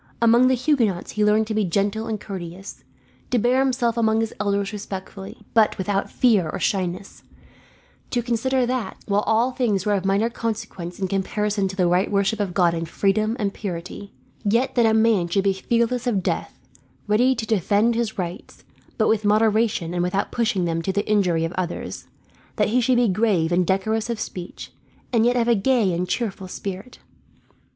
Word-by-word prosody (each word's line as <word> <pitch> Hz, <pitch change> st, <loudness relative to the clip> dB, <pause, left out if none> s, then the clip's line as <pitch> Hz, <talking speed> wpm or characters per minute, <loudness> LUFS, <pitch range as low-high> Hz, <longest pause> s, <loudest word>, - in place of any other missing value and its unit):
Among 235 Hz, +2 st, +5 dB
the 260 Hz, -, +3 dB
Huguenots 240 Hz, -, 0 dB
he 210 Hz, -, 0 dB
learned 210 Hz, +1 st, +3 dB
to 220 Hz, -, -4 dB
be 215 Hz, 0 st, +1 dB
gentle 200 Hz, +4 st, -1 dB
and 220 Hz, -2 st, -3 dB
courteous; 185 Hz, -1 st, -8 dB, 0.5 s
to 250 Hz, -, +1 dB
bear 245 Hz, +3 st, +2 dB
himself 250 Hz, -3 st, +1 dB
among 220 Hz, -1 st, +2 dB
his 225 Hz, -, -3 dB
elders 200 Hz, 0 st, -1 dB
respectfully, 195 Hz, 0 st, -8 dB
but 220 Hz, -2 st, +3 dB
without 195 Hz, +1 st, -1 dB
fear 210 Hz, -10 st, +2 dB
or -, -, -4 dB
shyness; 185 Hz, -1 st, -2 dB, 0.9 s
to 240 Hz, -1 st, -1 dB
consider 250 Hz, +2 st, 0 dB
that, 250 Hz, -4 st, -3 dB
while 205 Hz, 0 st, +1 dB
all 230 Hz, +4 st, +2 dB
things 215 Hz, -7 st, 0 dB
were 210 Hz, -, +2 dB
of 195 Hz, -2 st, 0 dB
minor 195 Hz, +3 st, +2 dB
consequence 220 Hz, -7 st, -5 dB
in 190 Hz, -, -1 dB
comparison 200 Hz, +1 st, -1 dB
to 190 Hz, -, -6 dB
the 185 Hz, -2 st, +2 dB
right 180 Hz, +3 st, +3 dB
to -, -, -10 dB
worship 200 Hz, 0 st, 0 dB
God 175 Hz, -2 st, +2 dB
in 165 Hz, 0 st, -3 dB
freedom 215 Hz, +6 st, 0 dB
and 200 Hz, -4 st, -2 dB
purity, 185 Hz, +1 st, -6 dB, 0.3 s
yet 235 Hz, +5 st, +1 dB
that 235 Hz, -3 st, +3 dB
a 220 Hz, -, +3 dB
man 220 Hz, -5 st, +3 dB
should 195 Hz, +3 st, 0 dB
be 195 Hz, -1 st, +2 dB
fearless 235 Hz, +5 st, 0 dB
of 200 Hz, -6 st, 0 dB
death, -, -, -3 dB, 0.5 s
ready 245 Hz, +5 st, +3 dB
to 225 Hz, -2 st, -4 dB
defend 215 Hz, +2 st, +2 dB
his 230 Hz, -2 st, -2 dB
rights, 180 Hz, +3 st, -6 dB, 0.3 s
but 220 Hz, -, +2 dB
with 220 Hz, -1 st, +2 dB
moderation 210 Hz, -4 st, +2 dB
and 175 Hz, -, -1 dB
without 180 Hz, +3 st, -1 dB
pushing 215 Hz, -6 st, 0 dB
them 165 Hz, -1 st, -1 dB
to 190 Hz, -, -1 dB
the 205 Hz, +2 st, -2 dB
injury 180 Hz, -6 st, +2 dB
of 165 Hz, -, -4 dB
others; 175 Hz, -1 st, -5 dB, 0.5 s
that 210 Hz, -2 st, +1 dB
he 250 Hz, +3 st, +2 dB
should 250 Hz, +1 st, +2 dB
be 240 Hz, -1 st, +3 dB
grave 190 Hz, -5 st, +1 dB
and 175 Hz, 0 st, +2 dB
decorous 220 Hz, +4 st, 0 dB
of 230 Hz, -2 st, -2 dB
speech, 180 Hz, -5 st, -7 dB, 0.4 s
and 230 Hz, 0 st, +4 dB
yet 245 Hz, -, +2 dB
of 235 Hz, -1 st, +1 dB
a 240 Hz, -, +5 dB
gay 225 Hz, -3 st, +2 dB
and 180 Hz, +1 st, -2 dB
cheerful 200 Hz, -5 st, -3 dB
spirit. 195 Hz, +5 st, -7 dB
210 Hz, 190 wpm, -23 LUFS, 190-230 Hz, 0.9 s, Among